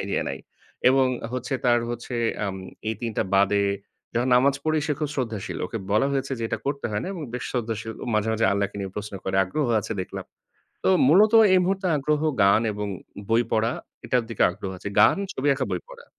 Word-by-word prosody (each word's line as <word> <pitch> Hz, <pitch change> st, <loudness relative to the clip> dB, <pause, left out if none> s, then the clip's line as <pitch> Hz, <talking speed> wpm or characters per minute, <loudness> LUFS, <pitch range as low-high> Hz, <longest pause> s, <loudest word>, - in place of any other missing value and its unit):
idea -, -, -1 dB
নাই -, -, -5 dB, 0.5 s
এবং 130 Hz, 0 st, +4 dB, 0.3 s
হচ্ছে 130 Hz, +2 st, -3 dB
তার 120 Hz, -1 st, +5 dB
হচ্ছে 120 Hz, +1 st, -5 dB, 0.3 s
আম 95 Hz, -1 st, -3 dB, 0.3 s
এই 110 Hz, -, -1 dB
৩ 120 Hz, -, -2 dB
টা -, -, +2 dB
বাদে 100 Hz, +1 st, +4 dB, 0.5 s
যখন 120 Hz, +2 st, +1 dB
নামাজ 135 Hz, +3 st, +4 dB
পড়ি 155 Hz, 0 st, +2 dB
সে 150 Hz, -, +1 dB
খুব 150 Hz, -, 0 dB
শ্রদ্ধাশীল। 115 Hz, -7 st, -3 dB
ওকে 115 Hz, -, -5 dB
বলা 110 Hz, +6 st, +3 dB
হয়েছে 135 Hz, 0 st, -1 dB
যে 115 Hz, -, -5 dB
এটা -, -, -2 dB
করতে 140 Hz, 0 st, -1 dB
হয় 105 Hz, 0 st, -1 dB
না -, -, -4 dB
এবং 175 Hz, -5 st, -6 dB
বেশ 125 Hz, -, -4 dB
শ্রদ্ধাশীল, 115 Hz, -2 st, -3 dB
ও -, -, -4 dB
মাঝে, 110 Hz, +1 st, +1 dB
মাঝে 110 Hz, 0 st, +1 dB
আল্লাহকে 100 Hz, 0 st, -1 dB
নিয়ে 95 Hz, -1 st, -4 dB
প্রশ্ন 105 Hz, -1 st, -5 dB
করে, 95 Hz, 0 st, -1 dB
আগ্রহ 140 Hz, +10 st, -1 dB
আছে -, -, -5 dB
দেখলাম। 90 Hz, -, -6 dB, 0.6 s
তো -, -, +2 dB, 0.2 s
মূলত 205 Hz, +8 st, +6 dB, 0.2 s
এই -, -, +6 dB
মুহূর্তে 190 Hz, +1 st, 0 dB
আগ্রহ 150 Hz, +1 st, 0 dB, 0.2 s
গান 100 Hz, +2 st, +5 dB
এবং 105 Hz, 0 st, -4 dB, 0.4 s
বই 115 Hz, +1 st, +4 dB
পড়া, 115 Hz, +1 st, +2 dB, 0.3 s
এটার 125 Hz, -1 st, +1 dB
দিকে 115 Hz, -, -1 dB
আগ্রহ 95 Hz, +1 st, -6 dB
আছে। 100 Hz, -, -5 dB
গান, -, -, +6 dB, 0.2 s
ছবি 135 Hz, +2 st, -1 dB
আঁকা, 135 Hz, -1 st, -1 dB
বই 90 Hz, -2 st, -1 dB
পড়া। -, -, -12 dB
120 Hz, 210 wpm, -25 LUFS, 105-135 Hz, 0.6 s, মূলত